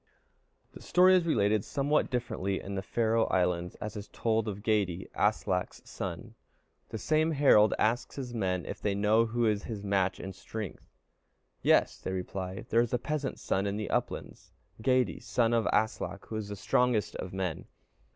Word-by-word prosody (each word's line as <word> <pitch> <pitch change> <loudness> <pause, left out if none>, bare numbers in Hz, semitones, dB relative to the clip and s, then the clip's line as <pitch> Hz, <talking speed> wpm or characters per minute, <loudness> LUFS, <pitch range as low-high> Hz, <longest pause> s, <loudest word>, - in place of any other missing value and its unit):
The - - -13
story 185 +1 +5
is 175 -2 +2
related 105 -7 +2
somewhat 145 +2 +1
differently 110 -6 -2
in 100 - -7
the 95 - -2
Faroe 115 +1 +1
Isles, 90 -1 0
and 105 0 -5
is 105 -1 -6
told 110 -1 0
of 100 -1 -5
Geyti, 100 -5 0
Aslak's - - -1
son. - - -6 0.6
The - - -4
same 155 +7 +2
Harald 135 -7 +5
asks 115 +3 0
his 130 -3 -5
men 90 -7 -1
if - - -6
they 100 -1 0
know 110 +3 +3
who 120 +1 0
is 105 -2 +1
his 105 -4 -5
match 100 -2 +1
in 95 - -6
strength. 105 0 -7 0.7
"Yes," - - +3
they - - -4
reply; 95 0 -4
"there 115 - +5
is 120 0 -2
a - - +2
peasant's 145 +2 -3
son 95 +1 0
in 100 +1 -2
the 105 - -4
uplands, - - -3 0.3
Geyti, 130 +2 +2
son 120 -1 +1
of 115 -1 +2
Aslak, 110 -2 -1
who 110 - -4
is 110 -2 -3
the 100 - -5
strongest 110 +2 +1
of 90 - -5
men." 95 -4 -3
110 Hz, 175 wpm, -30 LUFS, 100-120 Hz, 0.7 s, story